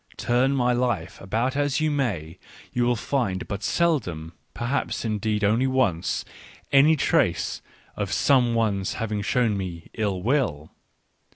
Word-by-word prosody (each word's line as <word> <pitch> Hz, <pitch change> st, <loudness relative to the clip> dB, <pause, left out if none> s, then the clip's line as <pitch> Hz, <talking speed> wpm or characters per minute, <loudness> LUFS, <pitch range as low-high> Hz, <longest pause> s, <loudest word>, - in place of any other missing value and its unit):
Turn 130 Hz, +3 st, +2 dB
my 125 Hz, -2 st, +2 dB
life 120 Hz, -8 st, -1 dB
about 115 Hz, +7 st, -1 dB
as 145 Hz, 0 st, +1 dB
you 155 Hz, 0 st, +1 dB
may, 100 Hz, -, -2 dB, 0.3 s
you 120 Hz, 0 st, +1 dB
will 120 Hz, 0 st, +2 dB
find 110 Hz, -6 st, -2 dB
but 100 Hz, 0 st, -4 dB
seldom 95 Hz, -, 0 dB
— -, -, -44 dB
perhaps 120 Hz, 0 st, -2 dB
indeed 105 Hz, -1 st, -1 dB
only 115 Hz, +6 st, +3 dB
once 110 Hz, -10 st, 0 dB, 0.2 s
— -, -, -23 dB
any 145 Hz, +3 st, +6 dB
trace 150 Hz, -, +1 dB, 0.3 s
of -, -, -3 dB
some 125 Hz, -4 st, +3 dB
one's 100 Hz, -4 st, 0 dB
having 110 Hz, -2 st, -3 dB
shown 115 Hz, 0 st, +1 dB
me 90 Hz, -4 st, -6 dB
ill 100 Hz, -4 st, -2 dB
will. 100 Hz, -, 0 dB
115 Hz, 150 wpm, -25 LUFS, 95-130 Hz, 0.3 s, any